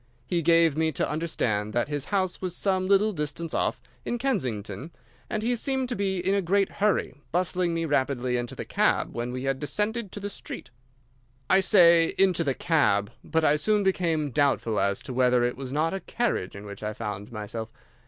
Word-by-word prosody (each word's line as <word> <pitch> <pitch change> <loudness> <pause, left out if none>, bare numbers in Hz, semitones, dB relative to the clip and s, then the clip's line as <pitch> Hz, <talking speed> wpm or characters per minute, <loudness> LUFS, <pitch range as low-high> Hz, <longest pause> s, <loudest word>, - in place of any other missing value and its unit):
He 175 -2 0
gave 165 -2 +4
me 160 0 +1
to - - 0
understand 115 -10 -1
that 120 +2 +1
his 145 -1 -3
house 190 -3 -1
was 180 -2 -2
some 185 -1 +1
little 200 +2 +4
distance 155 -1 -4
off, - - 0 0.2
in 240 - -2
Kensington, 155 - -2 0.4
and 215 0 -2
he 245 +2 +1
seemed 265 +1 -1
to 245 - -2
be 195 -1 -1
in 185 +2 0
a 200 - +2
great 195 +2 +2
hurry, 210 0 0 0.2
bustling 175 0 0
me 165 0 -1
rapidly 130 -4 0
into 120 -1 -3
the - - -6
cab - - +1
when 120 +1 -3
we 125 +1 -4
had 135 0 -1
descended 210 +7 -1
to - - -6
the 200 - -4
street. - - -8 0.8
"I 190 - +7
say 170 -4 +5
into 185 -3 +3
the 135 -4 0
cab, 105 -11 +2
but 160 0 0
I 150 -1 +4
soon 210 +6 +2
became 165 -6 0
doubtful 130 -5 +1
as 100 0 0
to 130 - -6
whether 125 -1 +3
it 120 0 0
was 130 -1 -6
not 155 +4 0
a 195 - -2
carriage 225 - -2
in 100 +1 -9
which 100 -1 -9
I 105 0 -3
found 105 -1 -6
myself. 110 +1 -6
160 Hz, 200 wpm, -26 LUFS, 125-190 Hz, 0.8 s, I